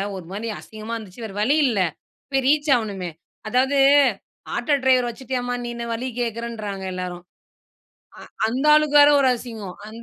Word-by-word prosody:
ஒரு 185 Hz, -, -8 dB
மாரி 215 Hz, +4 st, -4 dB
அசிங்கமா 220 Hz, +1 st, -7 dB
இருந்துச்சு, 220 Hz, 0 st, -9 dB
வேற 200 Hz, -2 st, -8 dB
வழி 280 Hz, +8 st, +3 dB
இல்ல 220 Hz, -5 st, 0 dB, 0.5 s
போய் 270 Hz, -1 st, +1 dB
ரீச் 295 Hz, +1 st, +2 dB
ஆகணுமே. 195 Hz, -6 st, -4 dB, 0.4 s
அதாவது 265 Hz, +4 st, +2 dB, 0.8 s
ஆட்டோ 245 Hz, +5 st, +1 dB
டிரைவர் 255 Hz, -2 st, +3 dB
வச்சிட்டியாம்மா 245 Hz, 0 st, -3 dB
நீ 240 Hz, -, -4 dB
என்ன 235 Hz, 0 st, -5 dB
வழி 245 Hz, +3 st, -3 dB
கேட்குறன்றாங்க 225 Hz, -4 st, -4 dB
எல்லாரும். 180 Hz, -1 st, -5 dB, 1.0 s
அ -, -, -11 dB, 0.3 s
அந்த 255 Hz, +5 st, -2 dB
ஆளுக்கு 300 Hz, -1 st, +3 dB
வேற, 290 Hz, 0 st, +8 dB
ஒரு 265 Hz, -, +4 dB
அசிங்கம். 220 Hz, -6 st, -8 dB
அந்த 230 Hz, +2 st, -10 dB
235 Hz, 155 wpm, -22 LUFS, 215-260 Hz, 1.0 s, வேற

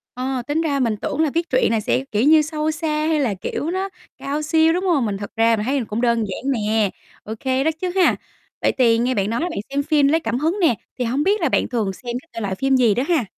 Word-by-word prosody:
Ờ, 255 Hz, 0 st, -2 dB
tính 300 Hz, +3 st, 0 dB
ra 285 Hz, -4 st, 0 dB
mình 230 Hz, -4 st, +1 dB
tưởng 285 Hz, +8 st, -3 dB
là 315 Hz, -, +2 dB
viết 335 Hz, 0 st, -1 dB
truyện 255 Hz, -3 st, +2 dB
là 225 Hz, -, +1 dB
sẽ, 250 Hz, +4 st, 0 dB
kiểu 210 Hz, +1 st, +1 dB
như, 310 Hz, +1 st, +6 dB
sâu 305 Hz, 0 st, -2 dB
xa 315 Hz, +1 st, -3 dB, 0.2 s
hay 315 Hz, -2 st, +1 dB
là, 235 Hz, -7 st, 0 dB
kiểu, 290 Hz, -, -4 dB
nó 380 Hz, +2 st, -2 dB, 0.3 s
cao 290 Hz, +2 st, -3 dB
siêu, 320 Hz, +1 st, +3 dB
đúng 360 Hz, +3 st, -1 dB
hông? 310 Hz, -, +2 dB
Mình 200 Hz, -, -2 dB
thật 205 Hz, -, -6 dB
ra 225 Hz, 0 st, +4 dB
mình 210 Hz, -, -3 dB
thấy 265 Hz, 0 st, 0 dB
cũng 215 Hz, +2 st, -2 dB
đơn 235 Hz, -1 st, +2 dB
giản 265 Hz, +9 st, -2 dB
nè, 215 Hz, -3 st, +1 dB, 0.3 s
ô 220 Hz, -, -5 dB
kê 265 Hz, 0 st, 0 dB
đó 320 Hz, -, +3 dB
chứ 365 Hz, -, -1 dB
ha. 370 Hz, -, +4 dB, 0.5 s
Vậy -, -, +3 dB
thì 230 Hz, -2 st, +4 dB
nghe 250 Hz, +2 st, +1 dB
bạn 200 Hz, -2 st, 0 dB
nói 230 Hz, -, -1 dB
là 345 Hz, -, -1 dB
bạn -, -, -4 dB
xem 280 Hz, +1 st, 0 dB
phim 290 Hz, -1 st, +3 dB
lấy 320 Hz, +3 st, +2 dB
cảm 240 Hz, -3 st, -2 dB
hứng 325 Hz, +7 st, 0 dB
nè, 315 Hz, -9 st, +4 dB, 0.2 s
thì 250 Hz, -, 0 dB
hông 255 Hz, +5 st, 0 dB
biết 405 Hz, +6 st, +2 dB
là -, -, +2 dB
bạn -, -, +1 dB
thường 220 Hz, -6 st, -1 dB
xem 240 Hz, +5 st, -6 dB
các 330 Hz, -, -28 dB
thể -, -, -5 dB
loại 200 Hz, -3 st, -2 dB
phim 270 Hz, +6 st, +1 dB
gì 235 Hz, -5 st, +4 dB
đó 250 Hz, -, 0 dB
ha? 315 Hz, -9 st, +2 dB
265 Hz, 285 wpm, -21 LUFS, 230-315 Hz, 0.5 s, như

